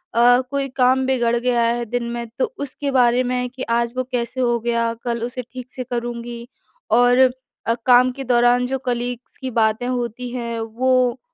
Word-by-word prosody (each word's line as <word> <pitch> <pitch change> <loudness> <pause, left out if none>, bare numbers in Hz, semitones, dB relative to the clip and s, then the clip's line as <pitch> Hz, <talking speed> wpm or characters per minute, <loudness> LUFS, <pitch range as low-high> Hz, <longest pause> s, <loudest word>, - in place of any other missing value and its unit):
अ, 245 +1 +6
कोई 280 -1 -1
काम 260 +1 +3
बिगड़ 240 -3 +1
गया 240 0 +1
है 235 +1 0
दिन 245 +2 -2
में 235 -1 -4
तो - - 0
उसके 285 0 -4
बारे 250 -1 +4
में 250 0 -1
कि 260 +1 -7
आज 235 +1 +1
वो 255 - +1
कैसे 245 +1 -2
हो 240 -1 +2
गया, 230 0 0
कल 235 0 -4
उसे 245 +1 -4
ठीक 255 0 -9
से 255 - -5
करूँगी। 240 0 -5 0.4
और 245 +1 +5 0.5
अ, 230 - +2
काम 250 0 +6
के 270 +1 -7
दौरान 245 0 +3
जो 265 +1 -1
कलीग्स 245 0 -3
की 260 -1 -5
बातें 220 +1 +1
होती 245 -1 -3
हैं, 235 -2 -4
वो 250 +2 +1
245 Hz, 185 wpm, -21 LUFS, 235-255 Hz, 0.5 s, अ